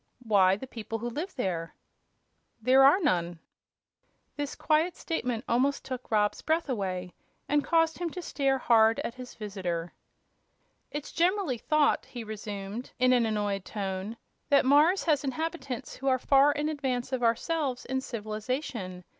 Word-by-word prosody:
"Why, 195 -4 +4
the 210 - -7
people 225 -2 -6
who 240 +2 -4
live 325 +10 -5
there." 170 -8 -3 0.8
"There 255 +4 +5
are 285 +8 +7
none." 175 - 0 1.0
This 290 -1 -4
great 320 +3 +1
statement 250 -7 -3
almost 270 +4 +1
took 255 -1 -6
Rob's 210 -1 +1
breath 320 -1 0
away, 185 -6 -3 0.3
and 290 0 +2
caused 325 -1 +2
him 350 -1 -1
to 360 +3 -6
stare 275 -4 +1
hard 225 -3 +4
at - - -4
his 255 0 -10
visitor. 185 -5 -4 1.0
"It's 295 0 -6
generally 345 - +1
thought," 305 +4 +2
he 240 -2 -7
resumed, 210 +1 -6
in 255 0 +4
an 240 -2 +3
annoyed 205 -3 -1
tone, 195 +2 -4 0.3
"that 280 -2 +5
Mars 300 +8 +5
has 300 -4 +2
inhabitants 280 -2 -4
who 270 - -5
are 260 -1 +4
far 275 +3 +5
in 295 +1 -1
advance 265 -5 -2
of 255 - -1
ourselves 250 +3 0
in 265 0 -1
civilization. 215 -4 -4
250 Hz, 150 wpm, -29 LUFS, 210-290 Hz, 1.0 s, are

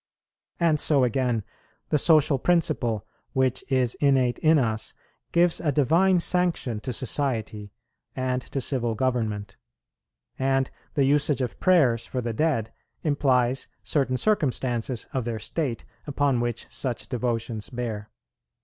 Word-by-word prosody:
And 165 -3 +3
so 140 -3 +3
again, 125 -2 0 0.5
the 150 - +2
social 150 -3 +4
principle, 120 - +1 0.3
which 130 -2 +1
is 125 -3 +2
innate 130 -4 +2
in 160 0 +4
us, 110 -5 -1 0.4
gives 170 0 +3
a 150 - 0
divine 170 +7 +3
sanction 170 -10 0
to 125 - -5
society 115 -5 -1 0.4
and 130 -1 -1
to 135 - -5
civil 120 -3 0
government. 110 -5 -2 0.8
And 135 0 +1 0.2
the 140 - +3
usage 145 0 +2
of 125 - -5
prayers 135 -11 +3
for 130 - -3
the 120 -2 -3
dead 115 -6 0 0.3
implies 130 -4 +1 0.2
certain 130 -4 0
circumstances 130 - 0
of 130 -2 -1
their 115 -1 -3
state 120 +3 -3 0.2
upon 140 -3 +1
which 120 -1 -2
such 125 -4 -2
devotions 115 -3 -2
bear. 115 -4 -5
130 Hz, 130 wpm, -25 LUFS, 120-145 Hz, 0.8 s, social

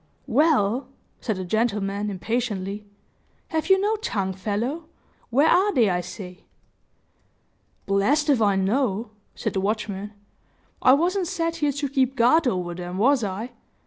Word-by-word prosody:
"Well!" 265 -3 +2 0.3
said 220 - -2
the 185 0 -5
gentleman, 205 -1 -1
impatiently, 205 0 -3 0.6
"have 320 +2 -2
you 385 0 +6
no 425 +3 +1
tongue, 195 - -2
fellow? 225 - -3 0.4
Where 275 +6 +4
are 380 +5 +4
they, 225 -6 +4
I 180 0 0
say?" 180 +1 -10 1.4
"Blessed 270 +11 +2
if 255 -5 +2
I 200 -2 +3
know," 210 +2 0 0.2
said - - -3
the 190 - 0
watchman. 205 0 -3 0.7
"I, 255 - +6
wasn't 355 +5 +1
set 330 -2 -2
here 295 -3 +1
to 285 +1 -2
keep 265 -1 +1
guard 255 +6 +4
over 180 -6 -1
them 175 +1 -6
was 255 +4 +3
I? 210 +5 -4
225 Hz, 145 wpm, -24 LUFS, 195-285 Hz, 1.4 s, you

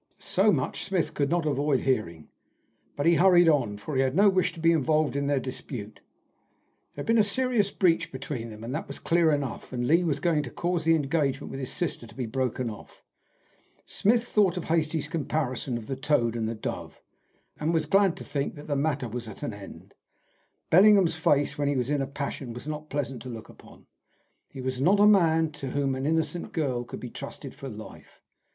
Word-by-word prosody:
So - - +2
much - - -1
Smith 175 -5 -1
could 140 -2 0
not 170 -1 +1
avoid 145 -1 +1
hearing, 105 - -1 0.7
but 145 - -2
he 170 0 +5
hurried 175 -2 +6
on, 125 -10 +2
for 135 +8 -6
he 130 - +3
had 130 +1 0
no 200 +2 +6
wish 185 -2 +1
to 165 - -11
be 165 +1 +4
involved 155 -1 +1
in 140 0 -1
their 140 -1 +2
dispute. 125 -4 -7 1.0
There 145 - -5
had - - -11
been 230 0 +3
a - - +6
serious 225 0 +1
breach 175 -4 +1
between 130 -3 -5
them, 110 -1 -10
that 150 +4 -4
was - - -7
clear 170 -1 +2
enough, 140 -4 -3
and 120 -1 -2
Lee 165 +7 +4
was 150 -4 0
going 160 -1 +2
to 140 - -6
cause 175 +3 -2
the 165 0 +5
engagement 145 -2 -1
with 135 - -6
his 130 - -4
sister 160 -8 -3
to - - -16
be 130 - -3
broken 125 +1 -2
off. 105 -2 -10 0.8
Smith 230 +3 +2
thought 205 -6 +2
of 175 - -3
Hastie's 160 -2 0
comparison 140 -6 -2
of 115 - -8
the 135 - -3
toad 130 -4 +1
and 110 -1 -1
the 115 - -3
dove, 110 - -6 0.6
and 155 +2 0
was 160 -2 +1
glad 195 +2 +3
to - - -8
think 140 -1 -3
that 145 - -10
the 145 - -1
matter 140 -3 0
was 115 +1 -6
at 105 - -10
an 115 - -3
end. 100 -1 -11 0.8
Bellingham's 195 -1 +6
face 145 -2 +1
when 145 - +1
he 145 - +1
was 125 +1 -1
in 145 -1 +1
a 135 - -2
passion 140 -3 -5
was 125 +5 -8
not 155 0 -5
pleasant 135 -3 -3
to 130 - -8
look 115 -2 -8
upon. - - -16 0.6
He 135 - -8
was 130 0 -3
not 195 +8 +4
a 205 - +7
man 165 -6 +4
to 150 -3 -6
whom 135 0 0
an 130 +2 -2
innocent 165 +2 -1
girl 130 -7 -1
could - - -8
be 125 - -7
trusted 140 -1 -8
for 135 - -8
life. 110 -2 -12
145 Hz, 210 wpm, -27 LUFS, 130-165 Hz, 1.0 s, a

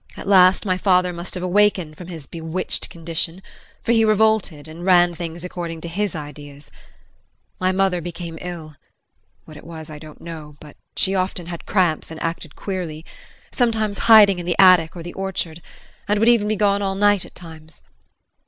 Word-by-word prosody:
At - - -8
last 185 -1 +5
my 185 -2 0
father 180 -2 +2
must 170 +2 -6
have 180 - -4
awakened 185 -4 +2
from 175 +2 -10
his 165 -5 -8
bewitched 165 +3 -4
condition, 165 +2 -3 0.4
for - - 0
he 225 -1 +4
revolted, 215 -8 +2
and 160 +2 -10
ran 175 -1 +4
things 170 0 -6
according 170 -2 -5
to 170 - -6
his 195 +2 -2
ideas. 145 -1 -10 0.9
My 185 0 +2
mother 185 -2 +1
became 170 -1 -7
ill 165 -5 -8 0.7
what 155 - -12
it - - -13
was 160 -2 -9
I 150 - -9
don't 155 -1 -13
know, 155 -3 -9
but 150 -1 -13 0.2
she 190 - +2
often 185 -2 -1
had 170 0 -8
cramps 180 -6 +1
and 160 0 -8
acted 165 -2 -4
queerly 170 -5 -5 0.5
sometimes 220 -4 0
hiding 205 -4 +8
in 175 - -6
the 175 - 0
attic 180 -4 +6
or 170 - -7
the 175 - -8
orchard, 175 -4 -4 0.5
and 210 - +2
would 225 +3 +4
even 230 -3 +3
be 215 - 0
gone 200 -1 +2
all 195 -1 -1
night 205 -1 +3
at - - -14
times. 160 -2 -12
175 Hz, 180 wpm, -21 LUFS, 160-195 Hz, 0.9 s, hiding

